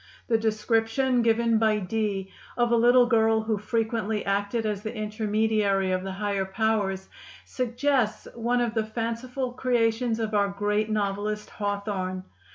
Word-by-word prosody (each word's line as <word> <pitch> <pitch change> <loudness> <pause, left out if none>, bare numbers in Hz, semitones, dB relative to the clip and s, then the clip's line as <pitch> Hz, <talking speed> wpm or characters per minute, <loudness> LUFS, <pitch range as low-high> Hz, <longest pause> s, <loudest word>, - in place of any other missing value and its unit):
The 225 - +4
description 225 +3 +1
given 230 0 +3
by 220 -1 +3
Dee 200 -1 -2 0.3
of 240 -1 +2
a - - +5
little 245 +2 +6
girl 225 -2 +3
who 220 -1 -1
frequently 220 -1 -1
acted 200 +3 0
as 210 -2 -2
the 220 +2 -5
intermediary 215 -2 0
of 185 0 0
the 190 0 -4
higher 200 0 -1
powers 195 -1 -1 0.4
suggests 250 -1 0
one 240 +1 0
of 235 -2 0
the 220 -1 +1
fanciful 235 +3 -3
creations 240 -2 +1
of 220 -1 -2
our 200 -1 +3
great 210 +2 -1
novelist 210 0 -2
Hawthorne. 200 -3 -3
220 Hz, 145 wpm, -26 LUFS, 205-230 Hz, 0.4 s, little